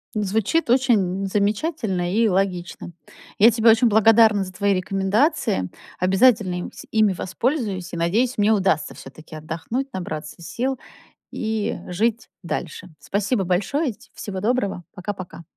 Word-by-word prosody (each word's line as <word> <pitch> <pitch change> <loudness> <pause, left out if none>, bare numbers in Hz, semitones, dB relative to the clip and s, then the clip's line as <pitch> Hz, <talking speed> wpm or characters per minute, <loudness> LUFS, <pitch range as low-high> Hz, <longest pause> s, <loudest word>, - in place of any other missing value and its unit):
Н 210 - 0
звучит 220 - 0
очень 210 -7 +2
замечательно 200 - -1
и 225 +2 +3
логично. 185 -3 -2 0.5
Я 220 +3 +8
тебе 225 0 +3
очень 230 +2 +5
благодарна 220 -1 +5
за 185 - -8
твои 200 +2 +1
рекомендациям, 195 - 0 0.3
обязательно 195 0 +3
им, 175 - -5
сь - - -11
ими 215 -3 +3
воспользуюсь 190 - -2
и - - -3
надеюсь, 220 +10 +1
мне 210 +1 +3
удастся 190 -7 +1
всё-таки 155 +4 -12
отдохнуть, 165 - -4
набраться 155 -3 -6
сил 255 +9 -3 0.5
и 220 -1 -2
жить 225 +5 -1
дальше. 180 0 -5
Спасибо 200 +1 -1
большое. 225 - 0
Ть - - -21
всего 190 -2 -5
доброго. 205 -4 -1
Пока-пока. 185 -2 -7
200 Hz, 135 wpm, -22 LUFS, 185-230 Hz, 0.5 s, Я